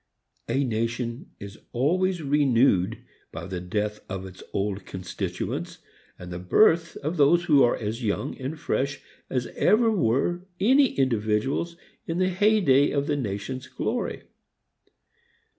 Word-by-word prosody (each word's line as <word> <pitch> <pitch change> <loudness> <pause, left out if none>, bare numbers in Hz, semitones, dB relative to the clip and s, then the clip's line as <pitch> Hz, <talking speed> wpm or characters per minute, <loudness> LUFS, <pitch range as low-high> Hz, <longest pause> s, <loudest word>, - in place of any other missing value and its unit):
A 135 +4 +1
nation 115 - -2
is 100 +1 -9
always 175 +7 +1
renewed 125 -8 +2 0.3
by - - -7
the 95 -1 -4
death 105 +4 -2
of 95 -1 -4
its 95 -1 -11
old 100 0 -2
constituents 90 -1 -4 0.4
and 90 0 -9
the 90 - -5
birth 165 - +3
of 160 +5 -2
those 160 +4 +5
who 145 -5 +5
are 120 - +4
as 110 +3 -4
young 115 +6 -1
and 140 +4 -5
fresh 135 -1 -1 0.3
as 125 -2 -1
ever 225 +1 +4
were 175 - +1 0.2
any 265 +5 +4
individuals 130 +6 0 0.3
in 165 - -2
the 185 0 +2
hey 210 +4 +3
day 140 -3 +4
of 140 -1 0
the 150 -1 0
nation's 125 +1 -4
glory. - - -3
130 Hz, 140 wpm, -26 LUFS, 105-165 Hz, 0.4 s, those